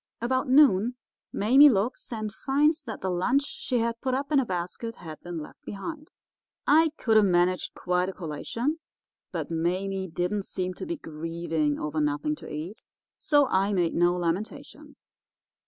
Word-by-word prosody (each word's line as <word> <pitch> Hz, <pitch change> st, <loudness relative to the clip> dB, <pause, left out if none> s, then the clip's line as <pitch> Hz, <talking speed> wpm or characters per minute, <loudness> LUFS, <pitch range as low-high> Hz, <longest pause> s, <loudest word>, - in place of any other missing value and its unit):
About 255 Hz, +2 st, 0 dB
noon 250 Hz, -5 st, +5 dB, 0.4 s
Mame 270 Hz, +8 st, +6 dB
looks 225 Hz, +5 st, -1 dB
and 215 Hz, -2 st, -4 dB
finds 295 Hz, +5 st, +1 dB
that 220 Hz, -4 st, -6 dB
the 190 Hz, -, -1 dB
lunch 250 Hz, +11 st, +2 dB
she 255 Hz, -3 st, -3 dB
had 230 Hz, 0 st, -1 dB
put 260 Hz, -1 st, 0 dB
up 280 Hz, +3 st, -3 dB
in 290 Hz, -, +5 dB
a 265 Hz, -, +1 dB
basket 185 Hz, +6 st, -4 dB
had 160 Hz, -4 st, -10 dB
been 175 Hz, -1 st, -6 dB
left 150 Hz, -, -9 dB
behind. 300 Hz, +10 st, -7 dB, 0.6 s
I 320 Hz, +2 st, +5 dB
could 220 Hz, -2 st, +3 dB
have 215 Hz, -, +6 dB
managed 180 Hz, 0 st, +1 dB
quite 180 Hz, +1 st, 0 dB
a -, -, -3 dB
collation, 210 Hz, -, -3 dB, 0.5 s
but -, -, -4 dB
Mame 185 Hz, +3 st, -1 dB
didn't 180 Hz, +4 st, -2 dB
seem 185 Hz, -1 st, -3 dB
to -, -, -7 dB
be 340 Hz, 0 st, -3 dB
grieving 160 Hz, -, -2 dB
over 150 Hz, +1 st, -2 dB
nothing 150 Hz, 0 st, 0 dB
to -, -, -10 dB
eat, 165 Hz, +8 st, -6 dB, 0.4 s
so 290 Hz, -2 st, +4 dB
I 195 Hz, +2 st, +2 dB
made 175 Hz, -3 st, +1 dB
no 175 Hz, +1 st, +3 dB
lamentations. 270 Hz, -, -5 dB
195 Hz, 165 wpm, -27 LUFS, 175-260 Hz, 0.6 s, Mame